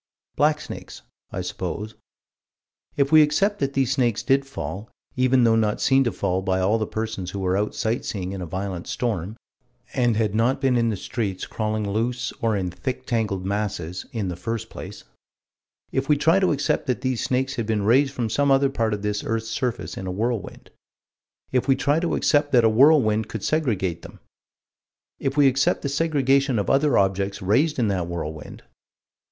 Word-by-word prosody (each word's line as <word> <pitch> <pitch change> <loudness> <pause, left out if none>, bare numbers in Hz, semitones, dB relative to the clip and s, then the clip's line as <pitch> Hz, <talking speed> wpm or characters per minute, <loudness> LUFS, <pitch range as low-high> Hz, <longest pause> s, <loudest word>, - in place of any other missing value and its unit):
Blacksnakes, 150 +1 -1 0.3
I - - -3
suppose. 110 +1 -5 1.0
If 140 -1 +2
we 155 -1 +8
accept 195 +8 +2
that 140 -1 -1
these 135 -2 +1
snakes 120 -4 +1
did 135 +2 +2
fall, 110 -5 -6 0.3
even 130 0 +3
though 115 -1 +4
not 110 -2 +1
seen 135 0 +4
to 120 - +1
fall 90 +1 -1
by 95 0 0
all 100 +5 +2
the 110 - -2
persons 110 -4 -4
who 100 - -5
were 95 -1 0
out 105 +2 -1
sight 115 +1 -1
seeing 95 -3 -4
in 95 -1 -5
a 90 - -5
violent 95 0 -4
storm, 110 -4 -3 0.6
and 120 -4 +2
had 110 -3 0
not 115 +4 +2
been 130 -2 +2
in 115 -1 +2
the 105 - -2
streets 100 -4 -3
crawling 110 -1 -2
loose 120 +5 -1
or 110 -2 +1
in 90 -2 -2
thick 125 +9 -5
tangled 110 -6 -1
masses, 95 -4 -3
in 110 -5 -3
the 90 - -3
first 115 +5 -4
place: - - -9 0.9
If 135 +2 -2
we 150 - +5
try 165 +6 +4
to 185 - +2
accept 145 0 0
that 125 -1 -1
these 130 -2 -1
snakes 130 +1 0
had 115 -3 -2
been 110 -2 0
raised 135 +6 +4
from 125 -4 -2
some 140 +6 +1
other 135 0 +4
part 110 -4 0
of 100 - -9
this 105 0 -1
earth's 115 0 -2
surface 125 -3 -3
in 95 - -5
a - - -2
whirlwind: 110 +2 -3 0.8
If 125 -1 +1
we 135 - +5
try 145 +3 +1
to 170 0 -1
accept 145 -1 +2
that 120 -2 +5
a - - +6
whirlwind 110 -4 +4
could 110 -3 -6
segregate 100 - 0
them - - -12 1.2
We 145 -1 +5
accept 135 +1 +1
the 140 - -1
segregation 140 -3 +2
of 100 - 0
other 140 -1 +3
objects 100 0 0
raised 130 - +2
in 120 -4 +2
that 90 -4 -1
whirlwind. 80 -3 -6
115 Hz, 190 wpm, -23 LUFS, 100-135 Hz, 1.2 s, we